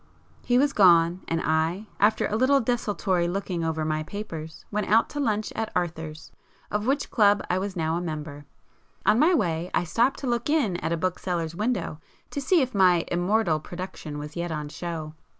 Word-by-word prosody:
He 245 - +2
was 280 +2 +3
gone; 175 -2 +5
and 165 - 0
I, 160 +6 0
after 210 +2 +3
a 210 - -1
little 260 +4 +4
desultory 205 -7 0
looking 180 -2 -2
over 160 -1 -1
my 155 0 0
papers, 160 -3 -7
went 210 0 -1
out 225 +2 +4
to 290 - -4
lunch 215 -6 -1
at 225 - -2
Arthur's, 160 -3 -3 0.4
of 210 +2 -1
which 280 +2 0
club 205 -3 +4
I 180 - +1
was 195 0 -4
now 160 -1 0
a - - -2
member. 150 -3 -6 0.6
On 220 - +4
my 335 +5 +5
way 175 - 0
I - - +2
stopped 235 +10 +1
to 270 - -3
look 240 +2 -1
in 265 - +2
at 160 -1 -3
a 170 - +1
bookseller's 175 -2 -2
window 185 -5 -2 0.3
to 285 - -3
see 315 +3 +3
if 255 - -4
my 180 -4 +4
'immortal' 175 -2 +1
production 175 -3 -7
was 150 +1 -7
yet 170 0 -3
on 150 -2 -4
show. 160 -1 -5
180 Hz, 190 wpm, -26 LUFS, 160-220 Hz, 0.6 s, gone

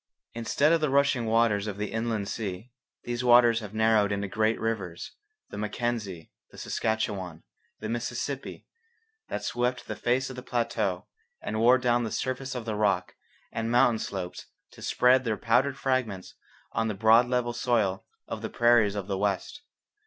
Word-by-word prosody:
Instead 130 +6 +1
of 165 - +2
the 155 - +1
rushing 140 -4 +2
waters 110 -2 +2
of 100 -2 -4
the 105 0 -3
inland 110 -2 -2
sea, 105 +2 -5 0.3
these 120 +1 -3
waters 120 -1 +6
have 105 -3 -8
narrowed 110 -2 +3
into 100 0 -1
great 110 +3 0
rivers 100 -7 -3 0.4
the - - -6
Mackenzie, 105 -5 -3 0.2
the - - -16
Saskatchewan, 100 -6 -2 0.4
the 110 - -4
Mississippi 120 +4 -4 0.6
that - - -4
swept 125 +1 -1
the - - -4
face 125 +2 0
of - - -8
the 125 - -7
plateau 115 -7 -1 0.3
and 110 - -3
wore 120 +3 +6
down 120 -1 +1
the 115 - -2
surface 130 +3 -3
of 120 -3 -5
the 110 - -2
rock 100 -4 0 0.4
and 115 0 -3
mountain 120 -1 +4
slopes 95 -4 -5 0.2
to - - -15
spread 125 +1 +3
their 110 -3 -1
powdered 130 +4 +2
fragments 130 -9 -2 0.4
on 110 - 0
the 105 - -2
broad 115 +3 +5
level 125 -1 0
soil 115 -6 0 0.2
of - - -5
the - - -4
prairies 120 -4 +4
of 100 -2 -3
the 95 -1 -3
west. 100 - -2
115 Hz, 165 wpm, -27 LUFS, 105-125 Hz, 0.6 s, waters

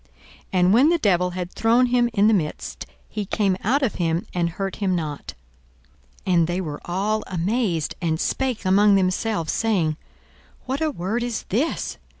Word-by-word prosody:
And 185 0 +3
when 260 +7 +6
the 345 - +3
devil 180 - +2
had 180 0 -4
thrown 235 +3 +3
him 245 -1 +2
in 205 -2 +3
the 220 - +5
midst, 160 -7 -3 0.2
he 210 - -4
came 195 -1 0
out 275 +7 +2
of 245 - +1
him, 165 +1 0
and 170 -1 0
hurt 195 +3 -4
him 190 -3 0
not. 150 -4 -5 0.9
42:004:036 185 - +1
And 170 -2 +4
they 175 +1 -1
were 155 -5 -5
all 205 +5 -1
amazed, 180 -2 -1
and 160 -2 0
spake 255 -3 -1
among 200 +2 +5
themselves, 185 -2 0
saying, 180 -9 +1 0.7
What 265 +3 -3
a 315 - +2
word 220 - -2
is 235 -2 -3
this! 265 - -1
195 Hz, 170 wpm, -23 LUFS, 175-225 Hz, 0.9 s, when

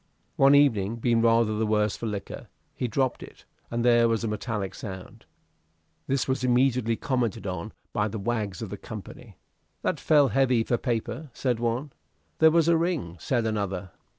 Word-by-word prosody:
One 140 -2 +6
evening, 115 -7 +3
being 115 0 +1
rather 115 -1 +3
the 110 +1 0
worse 105 -1 +1
for 115 - -5
liquor, 105 -2 -6 0.3
he 125 - -2
dropped 130 +2 -1
it, - - -13 0.2
and 120 0 -1
there 120 -1 +5
was 115 0 0
a - - -1
metallic 105 -2 -3
sound. 95 -4 -9 0.8
This 135 0 0
was 130 0 -1
immediately 125 -2 +2
commented 120 -5 -2
on 95 +2 -4 0.2
by 105 0 +1
the 110 +1 -5
wags 105 -2 -2
of 100 - -7
the 105 - -5
company. 105 -2 -10 0.5
"That - - 0
fell 145 -3 +4
heavy 130 -4 +2
for 120 - 0
paper," 125 +5 -3
said 125 -4 -1
one. 115 0 +1
"And 145 -1 -12 0.5
there 160 - +7
was 165 0 +3
a 170 -1 +5
ring," 160 - -2
said 120 +6 0
another. 100 -4 -2
115 Hz, 180 wpm, -26 LUFS, 105-130 Hz, 0.8 s, there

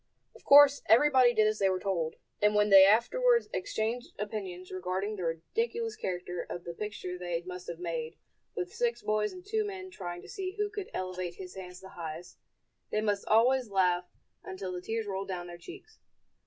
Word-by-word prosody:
Of - - -17
course 285 0 +8
everybody 255 +2 +6
did 215 -2 +3
as 215 0 +1
they 195 - +3
were 185 -1 0
told; 175 -5 -2 0.3
and 210 0 +4
when 210 0 +3
they 195 0 +10
afterwards 470 - +3
exchanged 245 - -2
opinions 195 -4 -5
regarding 185 +3 -2
the 185 - -5
ridiculous 450 - -2
character 180 -1 -4
of 175 - -6
the 170 - -6
picture 185 -2 -5
they 175 -1 -3
must 180 0 -8
have 170 - -5
made, 165 -2 -4 0.4
with 180 0 -4
six 240 -1 -1
boys 210 0 0
and 365 0 -11
two 435 +1 0
men 380 -2 -6
trying 175 - -7
to - - -12
see 375 -1 -5
who 415 0 -1
could 410 -3 -6
elevate 185 -1 -4
his 185 -1 -9
hands 180 -1 -9
the 190 - -11
highest, 165 -1 -8 0.5
they 215 - 0
must 205 -2 -1
always 245 +2 +4
laugh 180 -2 +2 0.4
until 190 0 -6
the 180 0 -5
tears 225 +3 -3
rolled 195 -1 -4
down 180 -2 -4
their 175 0 -10
cheeks. 400 - -12
200 Hz, 190 wpm, -30 LUFS, 180-245 Hz, 0.5 s, they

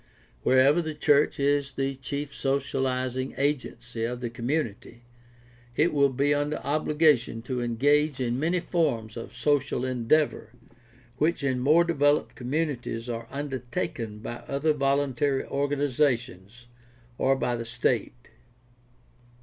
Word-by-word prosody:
Wherever 135 - +4
the 155 -2 -5
church 145 -1 +3
is 140 0 +1
the 135 0 -1
chief 140 +2 -5
socializing 130 -2 -1
agency 125 -5 -2
of 120 +1 -2
the 120 -2 -4
community, 120 -2 -3 0.7
it 160 +6 +2
will 140 -1 +4
be 140 +3 +1
under 145 +1 0
obligation 150 -5 +2
to 125 0 -3
engage 145 +5 +2
in 125 0 -1
many 170 +4 +1
forms 125 - -1
of 115 - -7
social 130 0 0
en 125 -3 -3
deavor 155 -4 +2 0.7
which 155 +1 +1
in 130 -2 0
more 150 +7 +5
developed 145 -3 +2
communities 125 -4 -3
are 115 -1 -4
undertaken 125 -5 -4
by 120 +2 -6
other 145 +3 +1
voluntary 140 -1 +1
organizations 130 -6 -1 0.5
or 135 +1 +3
by 125 -2 -1
the 115 - -4
state. 115 - -2
135 Hz, 125 wpm, -27 LUFS, 120-145 Hz, 0.7 s, more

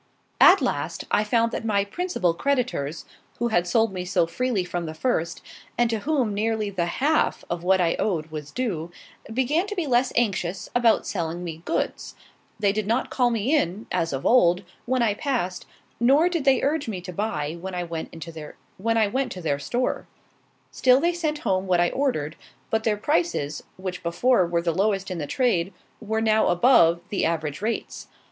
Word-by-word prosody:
At - - +7
last, - - -2
I 210 - +3
found 230 +2 +1
that - - -4
my 200 -3 +1
principal 205 - -1
creditors, 240 - -1 0.3
who 240 0 0
had 175 -5 +1
sold 220 +3 +2
me 180 -1 -3
so 180 -1 +1
freely 235 +2 -1
from 175 -1 -4
the 160 - -6
first, 170 -4 -1 0.3
and 240 -1 +2
to 225 - 0
whom 260 -4 0
nearly 215 0 -1
the 175 -3 -1
half 305 +4 +1
of 175 0 -3
what 190 +1 +3
I 170 -2 +2
owed 165 -7 -1
was 150 -2 -6
due, 175 -9 -3 0.4
began 275 - +1
to 415 - -4
be 355 -4 -1
less 250 -1 +2
anxious 190 -5 -1
about 240 -2 +3
selling 170 -2 -3
me 165 -2 -6
goods. - - -2 0.4
They 200 -2 +3
did 215 -1 -2
not 230 +4 0
call 250 -2 +2
me 235 +6 +1
in, 210 - -1
as 170 -2 0
of 135 -1 -4
old, 180 -6 +4 0.2
when 255 -1 +2
I 215 -3 +2
passed, 215 - -2 0.3
nor 275 +8 +4
did 335 -5 -2
they 270 -1 +4
urge 290 -1 0
me 205 -5 -3
to 180 0 -8
buy 160 -7 -2
when 190 0 -5
I 180 - -2
went 165 -2 -5
to 165 - -8 1.1
their 145 -3 0
store. 245 - -2 0.6
Still 255 0 +4
they 340 +4 +1
sent 315 -3 -1
home 190 0 +1
what 180 -1 +3
I 175 0 +3
ordered; 170 - -1 0.3
but 220 0 +1
their 215 -2 +2
prices, 215 - 0 0.2
which 185 -1 -5
before 185 +3 +2
were 170 0 0
the 170 -1 +1
lowest 195 +1 0
in 180 - -3
the 145 - -4
trade, 195 - +1 0.3
were 220 0 -2
now 220 -1 +3
above 175 -4 +5
the 205 - -1
average 160 -1 -1
rates. 225 +2 -3
205 Hz, 185 wpm, -24 LUFS, 175-250 Hz, 1.1 s, At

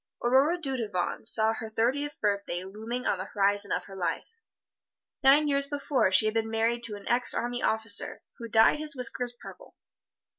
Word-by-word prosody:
Aurora 270 +8 +3
Dudevant 230 - -3
saw 220 -1 +6
her 225 0 -7
thirtieth 265 +7 -2
birthday 200 -4 -2
looming 220 +6 -6
on 190 - 0
the 190 - -4
horizon 200 0 0
of - - -1
her 195 - -12
life. 185 -2 -3 1.0
Nine 285 +3 +5
years 280 -1 +1
before 280 -7 0
she 190 +3 +4
had 215 - 0
been 225 0 -1
married 225 +1 0
to 215 -2 -5
an 205 - -12
ex 245 +1 +2
army 245 +1 -3
officer, 220 -1 -1 0.2
who 230 - -7
dyed 225 +6 +4
his 305 -2 -3
whiskers 245 -1 -3
purple. - - -14
230 Hz, 175 wpm, -27 LUFS, 210-265 Hz, 1.0 s, saw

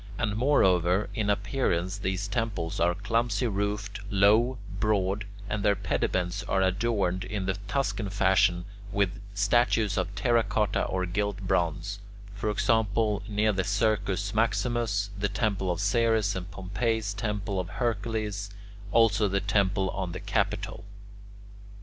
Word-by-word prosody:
And 105 - -1
moreover, 95 - +3
in 105 -2 -1
appearance 100 -4 0
these 95 +1 -2
temples 100 -6 -2
are 85 +1 +2
clumsy 115 +3 0
roofed, 105 0 -2
low, 110 +5 +4 0.2
broad, 100 -1 +1 0.2
and 105 0 -2
their 105 -1 +4
pediments 90 0 -1
are 95 -2 +1
adorned 95 -1 0
in 100 -3 -3
the 95 - +1
Tuscan 115 -4 -1
fashion 95 -3 +3 0.3
with 100 -1 0
statues 105 0 +2
of 95 +2 -3
terra 115 +3 +3
cotta 105 -2 0
or 95 0 -1
gilt 100 +2 -2
bronze: 95 +1 -1 0.3
for 105 +1 -2
example, 105 0 +1
near 105 +1 +2
the 95 -1 0
Circus 100 -3 0
Maximus, 110 -1 0
the 100 0 0
temple 100 -4 -1
of 90 -1 -1
Ceres 110 0 +2
and 90 0 -5
Pompey's 105 +2 -2
temple 105 -1 -2
of 90 -1 -3
Hercules; 105 -2 -2 0.4
also 110 -1 +4
the 100 0 0
temple 100 -1 +1
on 95 -3 -4
the 90 - -5
Capitol. - - -2
100 Hz, 135 wpm, -28 LUFS, 95-110 Hz, 0.4 s, low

